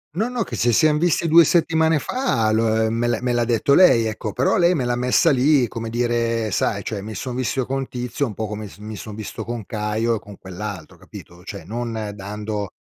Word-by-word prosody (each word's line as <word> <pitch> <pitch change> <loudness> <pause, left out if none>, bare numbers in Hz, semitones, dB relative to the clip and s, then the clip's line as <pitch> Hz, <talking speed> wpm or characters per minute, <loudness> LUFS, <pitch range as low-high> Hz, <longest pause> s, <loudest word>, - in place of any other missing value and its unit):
No, 220 +6 0
no, 245 -2 -1
che 125 - -7
si 120 +1 +2
sian 155 +3 +4
visti 170 +1 +1
2 165 +1 +7
settimane 160 -1 +2
fa, 195 - 0
lo 110 0 +2
me 115 +1 0
l'ha 120 - 0
me 125 -1 0
l'ha 120 0 +2
detto 120 +4 +2
lei, 125 -11 +6
ecco, 110 -1 -3
però 130 - +1
lei 175 0 +4
me 135 -7 -1
l'ha 120 0 0
messa 125 +7 +3
lì, 135 -1 +3
come 115 0 -6
dire, 115 -1 0
sai, 100 +1 0
cioè 105 -3 -4
mi 110 +2 -7
son 125 +5 -5
visto 130 0 -1
con 135 0 -3
Tizio, 125 +3 -3
un 115 - -5
po' 110 +2 -4
come 105 0 -6
s - - -15
mi 105 +1 -8
son 105 +2 -8
visto 110 -2 -6
con 115 -3 -5
Caio 110 +1 -1
e - - -4
con 100 -1 -13
quell'altro, 95 -2 -7
capito? 85 +1 -13
Cioè, 100 -3 -8
non 115 0 -4
dando 105 0 -5
115 Hz, 225 wpm, -21 LUFS, 105-130 Hz, -, 2